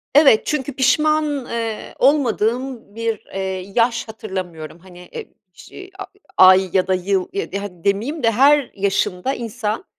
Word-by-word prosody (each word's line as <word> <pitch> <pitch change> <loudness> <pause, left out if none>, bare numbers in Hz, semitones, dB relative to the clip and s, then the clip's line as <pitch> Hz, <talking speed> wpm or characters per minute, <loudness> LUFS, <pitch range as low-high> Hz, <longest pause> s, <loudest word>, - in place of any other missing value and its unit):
Evet 280 -7 +6
çünkü 285 -2 -2
pişman, 295 +1 +1
eee, 230 -2 -5
olmadığım 250 -4 0
bir, 230 -2 -3
eee, 190 0 -4
yaş 235 0 +1
hatırlamıyorum. 185 -7 -7
Hani 180 0 -15
e - - -6 0.3
ş 380 - -12
a 390 - -5 0.3
ay 185 0 +7
ya 185 -1 +2
da 190 - +2
yıl 185 0 0
e 400 +1 -4
di - - -2
hadi 200 -4 -8
demeyeyim 225 +10 -1
de 230 - +4
her 275 +3 +4
yaşında 195 +3 -1
insan, 230 - -4
225 Hz, 150 wpm, -20 LUFS, 190-270 Hz, 0.3 s, ay